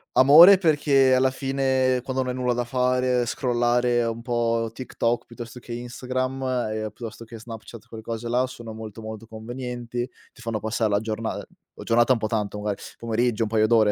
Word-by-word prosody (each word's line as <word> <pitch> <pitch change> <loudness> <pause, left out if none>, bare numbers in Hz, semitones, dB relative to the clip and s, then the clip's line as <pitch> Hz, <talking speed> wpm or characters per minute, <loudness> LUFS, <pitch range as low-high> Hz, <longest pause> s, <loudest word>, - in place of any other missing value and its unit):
Amore 165 +9 +9
perché 145 -6 +3
alla 130 +1 +4
fine 130 -1 0
quando 130 0 -1
non 125 - -2
hai - - -5
nulla 125 -1 0
da 120 0 -1
fare, 125 0 +1
scrollare 120 -1 +1
un 115 0 -4
po' 115 -1 0
TikTok 120 -1 -2
piuttosto 120 +1 -9
che 120 0 -8
Instagram, 130 +2 -3 0.3
ehm, 110 0 -3
piuttosto 115 +1 -9
che 115 0 -10
Snapchat, 115 0 -10
quelle 110 -1 -10
cose 115 +1 -5
là, 125 +2 +1
sono 115 -3 -9
molto 110 0 -8
molto 110 0 -8
convenienti, 120 +2 -5 0.2
ti 120 - -16
fanno 115 -2 -3
passare 110 0 -1
la 100 0 +2
giorna 110 0 -3
ehm, - - -6 0.4
giornata 120 +2 +4
un - - 0
po' 110 - -2
tanto 105 -2 -2
magari, 105 -1 -3 0.2
pomeriggio, 115 0 0
un 105 - -2
paio 110 -1 +3
d'ore, 110 -3 +4
120 Hz, 185 wpm, -24 LUFS, 115-130 Hz, 0.4 s, Amore